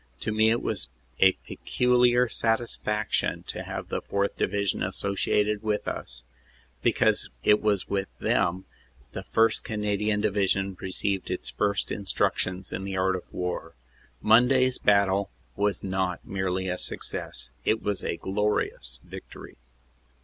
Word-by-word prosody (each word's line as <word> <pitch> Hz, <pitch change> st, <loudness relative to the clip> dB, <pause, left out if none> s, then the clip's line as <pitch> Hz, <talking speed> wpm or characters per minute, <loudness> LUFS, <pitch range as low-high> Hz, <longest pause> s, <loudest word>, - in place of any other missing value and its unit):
To -, -, -1 dB
me 110 Hz, +1 st, +4 dB
it 115 Hz, +1 st, +1 dB
was 90 Hz, -, -1 dB, 0.3 s
a 95 Hz, -1 st, +7 dB
peculiar 125 Hz, 0 st, +3 dB
satisfaction 115 Hz, -2 st, 0 dB
to -, -, -5 dB
have -, -, -6 dB
the -, -, -2 dB
4th. 100 Hz, 0 st, -1 dB
Divi 100 Hz, +1 st, 0 dB
sion 95 Hz, -, 0 dB
associated 100 Hz, +2 st, 0 dB
with 105 Hz, -1 st, -1 dB
us, -, -, -5 dB, 0.6 s
because -, -, +2 dB
it 105 Hz, -, +5 dB
was 105 Hz, -3 st, +1 dB
with 100 Hz, -1 st, -1 dB
them 90 Hz, +2 st, +1 dB, 0.5 s
the -, -, -5 dB
1st. 115 Hz, 0 st, +3 dB
Cana 105 Hz, -2 st, -1 dB
dian 105 Hz, 0 st, +1 dB
Division 100 Hz, -2 st, +1 dB
received 95 Hz, +1 st, -2 dB
its -, -, -3 dB
first 100 Hz, -1 st, 0 dB
instructions 95 Hz, -2 st, -1 dB
in 95 Hz, -, -4 dB
the 95 Hz, -1 st, -3 dB
art 95 Hz, 0 st, +2 dB
of 90 Hz, -, -8 dB
war. 90 Hz, -3 st, -4 dB, 0.5 s
Monday 125 Hz, +4 st, +6 dB
s 130 Hz, -1 st, -1 dB
battle 100 Hz, -1 st, +3 dB, 0.3 s
was 100 Hz, 0 st, 0 dB
not 95 Hz, -2 st, -1 dB
merely 95 Hz, -1 st, -1 dB
a 90 Hz, 0 st, -2 dB
success; 60 Hz, -1 st, -3 dB
it 110 Hz, -, +1 dB
was 100 Hz, -2 st, -1 dB
a -, -, -2 dB
glorious 95 Hz, -10 st, -1 dB
victory." -, -, -10 dB
100 Hz, 140 wpm, -27 LUFS, 95-105 Hz, 0.6 s, a